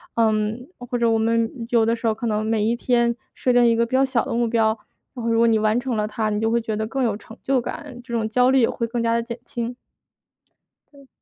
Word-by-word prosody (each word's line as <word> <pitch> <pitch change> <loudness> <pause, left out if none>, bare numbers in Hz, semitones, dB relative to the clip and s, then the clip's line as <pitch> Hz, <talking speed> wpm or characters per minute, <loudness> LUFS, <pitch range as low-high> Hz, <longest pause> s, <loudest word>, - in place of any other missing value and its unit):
嗯， 220 +3 0
或 245 0 -4
者 235 -1 +2
我 225 - +2
们 230 +1 0
有 230 -2 +3
的 230 +1 +2
时 230 - -2
候 220 - +3
可 225 - -5
能 215 0 0
每 220 -1 +1
一 230 +2 +1
天 235 -1 +1 0.2
设 255 - +1
定 245 0 +5
一 230 - +4
个 235 +1 +2
比 235 - -11
较 270 +1 +4
小 255 -4 0
的 - - -3
目 235 0 +1
标， 225 -1 +3 0.5
然 240 - -6
后 - - +1
如 225 - +2
果 235 - +5
你 220 -1 +3
完 215 +1 +2
成 245 -3 -2
了 210 0 0
它， 215 0 -2
你 210 0 -1
就 225 +1 +1
会 235 0 +2
觉 220 -1 -3
得 220 0 -2
更 270 +3 -2
有 220 -4 0
成 225 +2 -14
就 265 -1 +2
感， 290 -2 -7
这 240 -1 -9
种 225 -2 0
焦 250 +3 +3
虑 265 -1 +4
也 230 - +3
会 230 - -2
更 235 0 -2
加 230 0 +2
地 235 - +1
减 235 0 -6
轻。 240 +1 -4 1.2
嗯。 275 -1 -17
230 Hz, 295 characters per minute, -22 LUFS, 225-245 Hz, 1.2 s, 定